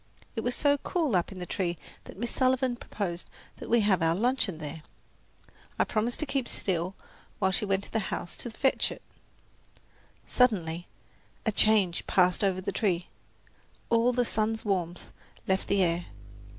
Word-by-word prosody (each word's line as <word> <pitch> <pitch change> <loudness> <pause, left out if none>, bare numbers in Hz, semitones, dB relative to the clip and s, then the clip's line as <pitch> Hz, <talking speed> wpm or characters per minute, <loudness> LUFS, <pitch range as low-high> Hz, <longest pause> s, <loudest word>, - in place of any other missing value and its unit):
It 225 - -1
was 245 +2 0
so 285 -1 +3
cool 315 - 0
up 175 +1 +1
in 190 - -8
the 180 - -4
tree 175 -2 -2 0.3
that - - -11
Miss 235 +3 -2
Sullivan 255 -1 +2
proposed 185 -7 -4 0.3
that - - -8
we 235 0 +5
have 200 -4 +3
our 165 0 +3
luncheon 225 -4 +1
there. 155 +1 -6 1.0
I - - +4
promised 225 +3 -1
to - - 0
keep 270 -3 -1
still 185 0 -1 0.4
while 190 -1 +2
she 190 - +1
went 195 0 +1
to - - -11
the 225 - +2
house 175 - -4
to 240 - -3
fetch 265 +4 +1
it. - - -9 1.2
Suddenly 175 -9 +2 0.6
a 220 - +2
change 205 -5 +3
passed 180 +1 +3
over 190 -2 +1
the 200 +2 -2
tree. 180 -3 0 0.8
All 230 +1 +4
the 245 0 +1
sun's 220 0 0
warmth 180 -4 -2 0.4
left 190 0 +1
the 200 -1 +3
air. 170 0 0
200 Hz, 165 wpm, -29 LUFS, 180-235 Hz, 1.2 s, we